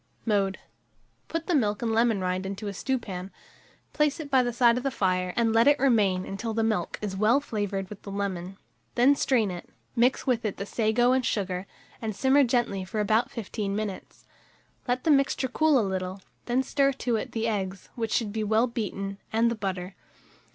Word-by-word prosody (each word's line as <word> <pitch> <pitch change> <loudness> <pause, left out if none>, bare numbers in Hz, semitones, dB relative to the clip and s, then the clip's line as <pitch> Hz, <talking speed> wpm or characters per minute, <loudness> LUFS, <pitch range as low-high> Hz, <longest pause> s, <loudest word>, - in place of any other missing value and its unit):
Mode. 200 -4 +1 0.7
Put 330 0 -3
the 360 - 0
milk 210 -7 +1
and 230 - 0
lemon 225 -3 +2
rind 185 0 -1
into 200 +2 -5
a 200 - -3
stewpan, 195 -5 -3 0.6
place 300 0 +1
it 290 -3 -7
by 260 -1 +5
the 245 -1 -1
side 235 0 +4
of - - -9
the 275 - +1
fire, 185 -6 0
and 230 -2 +2
let 230 +2 +5
it 290 0 +6
remain 210 -9 +2
until 220 +3 -4
the 225 - +1
milk 215 -6 -1
is 200 -2 -3
well 215 +7 +4
flavoured 205 -7 -3
with 205 0 -10
the - - -9
lemon; 195 -2 -4 0.4
then 260 +4 +5
strain 230 -8 +2
it, 175 -1 -8 0.3
mix 245 +2 +2
with 245 -3 +1
it 210 -3 -2
the 200 - -4
sago 230 +3 +2
and 260 0 +2
sugar, 190 -4 -2 0.3
and 220 -3 -3
simmer 270 +5 +4
gently 235 -6 0
for 190 +4 -4
about 220 +4 +2
15 210 -4 -4
minutes. 210 -3 -5 0.6
Let 250 +1 0
the 320 - +3
mixture 275 -1 +2
cool 305 +3 +3
a 225 - +2
little, 190 0 -3 0.3
and 255 +2 +1
stir 275 0 +2
to 245 -2 -1
it - - -5
the 225 0 -1
eggs, 195 -3 -3
which 225 -2 -3
should 215 -4 0
be 220 -1 -1
well 220 +3 +3
beaten, 200 -4 -4
and 230 +1 +3
the - - -1
butter. 190 -3 -4
220 Hz, 200 wpm, -27 LUFS, 195-245 Hz, 0.7 s, it